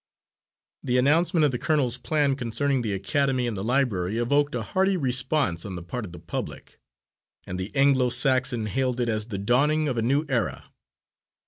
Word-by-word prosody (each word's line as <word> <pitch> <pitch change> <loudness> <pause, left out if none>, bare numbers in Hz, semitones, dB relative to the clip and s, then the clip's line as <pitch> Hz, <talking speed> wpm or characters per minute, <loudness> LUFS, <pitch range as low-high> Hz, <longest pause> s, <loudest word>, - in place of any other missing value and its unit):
The 125 0 0
announcement 160 +5 +3
of 145 - +2
the 125 - -3
colonel's 130 -6 0
plan 145 0 +1
concerning 135 +2 0
the 110 -4 -2
academy 130 +6 0
and 120 -3 -2
the 95 - -4
library 110 -6 0
evoked 145 +4 +1
a 120 - -2
hearty 190 - +1
response 130 - 0
on 95 -2 -6
the 85 - -7
part 110 +7 -5
of 90 - -10
the 85 - -10
public, 85 +1 -7 0.7
and 90 - -5
the 95 +3 -4
Anglo 135 -2 +3
Saxon 130 -3 +1
hailed 125 +3 -1
it 120 -1 0
as 110 -1 -1
the 105 -5 -4
dawning 145 +9 +2
of 125 -4 -1
a - - 0
new 140 +7 +1
era. 125 -4 -2
125 Hz, 185 wpm, -25 LUFS, 110-140 Hz, 0.7 s, announcement